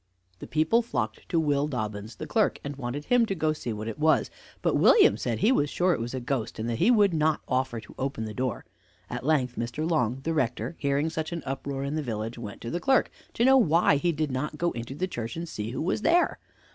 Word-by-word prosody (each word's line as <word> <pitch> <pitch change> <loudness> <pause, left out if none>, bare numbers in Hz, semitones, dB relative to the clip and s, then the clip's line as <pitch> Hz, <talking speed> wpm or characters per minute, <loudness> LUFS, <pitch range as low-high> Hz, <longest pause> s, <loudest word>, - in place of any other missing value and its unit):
The - - -8
people 160 +10 +2
flocked 120 - -4
to 170 - +2
Will 145 -2 +1
Dobbins, 110 -5 -4
the - - -6
clerk, - - +1
and 145 0 -5
wanted 135 +2 -5
him 245 -2 +3
to 195 - -2
go 155 -2 +1
to 155 - -11
see 120 - -3
what 110 0 -5
it 115 +6 -5
was; 155 +1 +3 0.3
but - - +2
William 425 -3 +6
said - - -2
he 220 - +3
was 145 - +2
sure 180 +4 +2
it - - -2
was 120 +3 -4
a - - -2
ghost, 125 -3 -3
and 110 +1 -3
that 115 -1 -2
he - - +4
would 205 -6 +5
not 155 -1 +1
offer 130 -2 0
to 110 - -13
open 130 -4 -2
the 110 - -6
door. 125 -1 -3 0.5
At 125 0 -4
length 130 -4 +1
Mr. 120 +7 -2
Long, 135 -6 0
the 165 - -1
rector, 130 +2 -1
hearing 140 +2 0
such 160 0 -3
an 170 -2 -4
uproar 135 0 -3
in 140 +1 -3
the 155 - -1
village, 115 -2 -4
went 105 -3 -8
to 115 - -5
the 175 - -1
clerk, 265 +5 +2 0.2
to 235 - +2
know 265 0 +7
why 165 - +4
he 170 +4 +1
did 155 -2 -2
not 150 +4 -3
go 175 +1 +1
into 120 +3 -6
the 185 +5 -1
church, 115 -9 -5
and 170 +1 -5
see 105 -8 -5
who 125 - -3
was 180 - 0
there. 345 +7 +3
140 Hz, 250 wpm, -27 LUFS, 120-165 Hz, 0.5 s, know